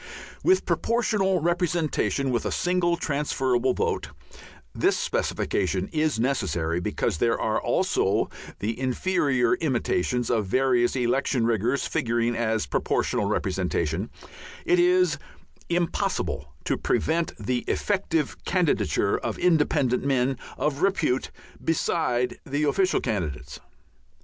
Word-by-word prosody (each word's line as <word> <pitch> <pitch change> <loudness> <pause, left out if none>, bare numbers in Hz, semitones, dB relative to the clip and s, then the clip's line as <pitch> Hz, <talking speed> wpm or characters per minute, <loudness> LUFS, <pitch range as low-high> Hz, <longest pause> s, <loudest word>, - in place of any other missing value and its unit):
With 375 +1 +3
Proportional 210 -6 +1
Representation 170 -5 0
with 120 - 0
a - - -2
single 175 -1 +1
transferable 130 -4 0
vote - - -1 0.7
(this - - +2
specification 95 +1 -1
is 155 -6 0
necessary, 90 -10 0
because 85 -2 -1
there 115 -1 +2
are 110 - 0
also - - +1 0.3
the 110 +4 -3
inferior 130 0 +1
imitations 125 - 0
of 110 -4 +1
various 125 +2 +2
election 125 0 +1
riggers 120 +4 +1
figuring 120 0 0
as 110 -5 0
proportional - - 0
representation), 90 0 -1 0.6
it 360 0 +3
is 365 +1 +3 0.5
impossible 170 -1 -1
to - - 0
prevent 165 +1 0
the 120 +3 -1
effective 170 -7 -1
candidature 180 -5 +1
of - - -3
independent 150 -7 +2
men 135 -1 +1 0.2
of 150 -1 -1
repute 190 -10 +1 0.3
beside 125 -6 0
the 145 +3 -2
official 185 +6 +2
candidates. 90 - -3
135 Hz, 110 wpm, -25 LUFS, 115-170 Hz, 0.7 s, With